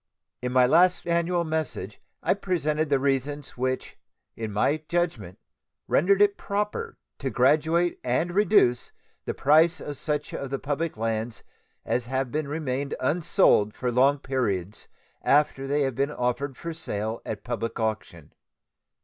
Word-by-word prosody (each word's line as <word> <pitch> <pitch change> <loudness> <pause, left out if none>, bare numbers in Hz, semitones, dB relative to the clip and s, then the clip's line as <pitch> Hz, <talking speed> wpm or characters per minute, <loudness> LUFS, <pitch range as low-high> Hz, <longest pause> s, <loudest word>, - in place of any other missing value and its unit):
In 125 0 -2
my 125 0 +5
last 175 +7 +4
annual 170 +1 +1
message 155 - -4 0.2
I - - +3
presented 155 -6 -1
the 140 - +4
reasons 140 +1 -1
which 130 +1 -3 0.4
in 110 -2 -5
my 105 +9 +2
judgment 130 - -2 0.5
rendered 195 +6 +4
it 200 -1 +2
proper 210 - -3 0.2
to 135 - -2
graduate 160 +7 +2
and 145 +8 0
reduce 200 - +3 0.3
the - - -3
price 160 +4 +4
of 145 -2 -7
such 150 -1 -2
of 140 - -4
the 135 - -2
public 145 +1 -3
lands 110 0 -3 0.4
as 120 -1 -1
have 130 -1 -2
remained 145 -2 -2
unsold 150 - +3
for 125 -1 -2
long 135 +4 +4
periods 110 -9 -2 0.3
after 140 -2 +2
they 145 +2 +1
had 135 -1 -1
been 140 +4 0
offered 130 0 -2
for 170 -1 -5
sale 110 -8 -4
at 110 - -6
public 115 -1 -4
auction. 110 -8 -4
140 Hz, 140 wpm, -26 LUFS, 125-160 Hz, 0.5 s, my